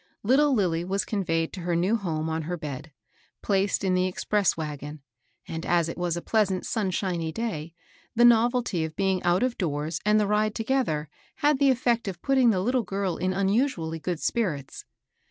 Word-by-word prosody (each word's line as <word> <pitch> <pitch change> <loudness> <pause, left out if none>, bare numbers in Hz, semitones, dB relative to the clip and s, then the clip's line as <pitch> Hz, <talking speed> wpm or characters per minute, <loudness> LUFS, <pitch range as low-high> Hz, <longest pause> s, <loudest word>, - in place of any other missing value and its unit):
Little 280 +7 +4
Lilly 175 -6 +1
was 195 +2 -1
conveyed 165 -6 -1
to 190 - -6
her 175 0 -1
new 185 +6 +2
home 160 -7 -2
on 160 0 -2
her 175 +3 -4
bed, 150 -1 -7 0.5
placed 200 0 +1
in 190 -1 +1
the 185 0 +2
express 200 +1 0
wagon; 150 -2 -6 0.4
and, 165 0 -5
as 170 -2 +2
it 165 - -5
was 175 -1 -1
a 170 - -5
pleasant, 200 -4 +1
sunshiny 185 -5 -1
day, 170 -6 -4 0.4
the 240 - +4
noyelty 240 -5 +4
of 160 0 -5
being 190 -2 +1
out 175 +5 +2
of 255 -1 -1
doors 155 -1 -2
and 210 +1 +4
the 210 - +2
ride 210 +1 +1
together 225 - 0 0.4
had 295 -2 +4
the 280 -1 +4
eflFect 240 -3 +1
of 185 -3 -4
putting 265 -3 +4
the 190 -5 +2
little 250 +5 +1
girl 195 -3 -2
in 185 +1 0
unusually 190 - 0
good 175 0 -3
spirits. 165 - -2
185 Hz, 185 wpm, -26 LUFS, 165-220 Hz, 0.5 s, Little